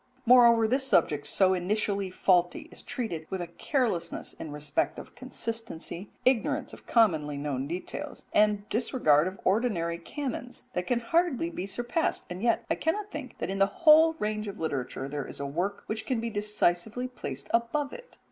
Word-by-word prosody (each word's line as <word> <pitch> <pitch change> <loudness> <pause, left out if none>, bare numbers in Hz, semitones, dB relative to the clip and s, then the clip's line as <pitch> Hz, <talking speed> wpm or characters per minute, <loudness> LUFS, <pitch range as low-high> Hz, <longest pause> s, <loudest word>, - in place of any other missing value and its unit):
Moreover, 235 -2 +7
this 265 +3 +1
subject 150 - +2
so 190 +4 +3
initially 200 +1 -1
faulty 180 -1 +2
is - - -7
treated 170 -11 -4
with 190 - -3
a 175 - -2
carelessness 175 - -2
in 160 - -8
respect 150 0 -1
of - - -10
consistency, 225 -7 -6 0.2
ignorance 255 -3 +1
of - - -13
commonly 155 -11 +3
known 140 -2 -2
details, 175 +4 -5
and 210 -1 +3
disregard 180 - +3
of 185 +1 -6
ordinary 185 -5 +1
canons, 250 - -5
that 180 0 -2
can 240 -1 +1
hardly 280 - +1
be 185 - -4
surpassed, 240 - -1
and 180 +1 -5
yet 230 0 +2
I - - +1
cannot 405 +6 -1
think 295 -4 -7
that - - -3
in 195 - -3
the 195 - +5
whole 320 +8 +6
range 215 -3 -2
of 200 - -7
literature 135 -4 -3
there 145 -1 -4
is - - -8
a 140 - -3
work 175 +8 -2
which 220 0 -4
can 255 -4 0
be 230 0 -3
decisively 210 +2 0
placed 255 - -7
above 255 +5 +1
it. - - -12
210 Hz, 175 wpm, -28 LUFS, 170-245 Hz, 0.2 s, Moreover